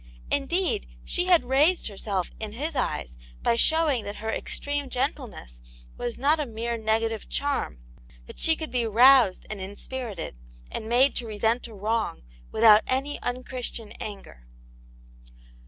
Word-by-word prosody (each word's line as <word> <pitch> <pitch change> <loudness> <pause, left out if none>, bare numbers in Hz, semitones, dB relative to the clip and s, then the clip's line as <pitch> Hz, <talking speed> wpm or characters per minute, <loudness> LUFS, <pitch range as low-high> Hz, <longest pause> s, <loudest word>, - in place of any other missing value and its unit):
Indeed, 360 - 0 0.2
she 355 - 0
had 355 -5 +5
raised 295 +8 +3
herself 195 -3 -2
in 215 -1 -5
his 295 +7 -4
eyes 60 - -2 0.2
by - - +3
showing 305 -2 +3
that 205 - -5
her 220 +1 -3
extreme 285 +2 -2
gentleness 245 - -4 0.3
was 240 -1 -4
not 295 +4 +3
a 295 - -1
mere 235 +1 -3
negative 225 0 -1
charm; 280 - -1 0.5
that - - -12
she 320 - +3
could 315 0 -6
be 240 -2 0
roused 240 -2 +6
and 205 -3 -5
inspirited, 205 - -5 0.4
and 220 - -5
made 255 +4 +4
to 235 - -3
resent 225 +3 0
a 230 - -12
wrong 215 - -2 0.3
without 215 -1 +7
any 270 +3 -1
unchristian 245 -3 -4
anger. 195 - -8
235 Hz, 140 wpm, -26 LUFS, 215-280 Hz, 0.5 s, without